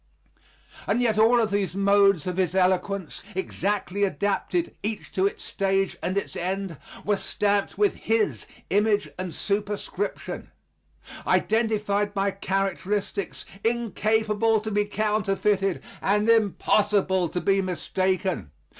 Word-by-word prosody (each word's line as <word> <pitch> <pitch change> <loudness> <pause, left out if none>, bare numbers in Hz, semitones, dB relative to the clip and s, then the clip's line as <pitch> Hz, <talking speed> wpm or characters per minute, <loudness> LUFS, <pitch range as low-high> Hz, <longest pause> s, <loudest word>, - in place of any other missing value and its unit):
And - - +2
yet 225 -3 +2
all 230 +1 +5
these 200 -3 -1
modes 200 -3 +4
of 180 -1 -3
his 185 -1 +1
eloquence, 190 -1 0
exactly 200 +1 -1
adapted 205 - 0
each 215 0 -4
to 190 +1 +2
its - - -6
stage 195 0 0
and 185 +2 -1
its 200 - -2
end, 185 -2 -3 0.3
were 205 -1 +2
stamped 205 0 0
with 410 -1 +2
his 225 -1 0 0.2
image 205 +1 +2
and 185 -1 -3
superscription, 205 +2 -3 0.8
identified 210 -2 +1
by 195 0 +1
characteristics 195 0 -2 0.2
incapable 220 -1 +1
to 220 0 -4
be 205 0 +2
counterfeited 205 -2 0 0.2
and 210 +2 +2
impossible 205 -4 +3
to 180 - -2
be 195 +1 +2
mistaken. 185 - -1
200 Hz, 115 wpm, -25 LUFS, 190-210 Hz, 0.8 s, all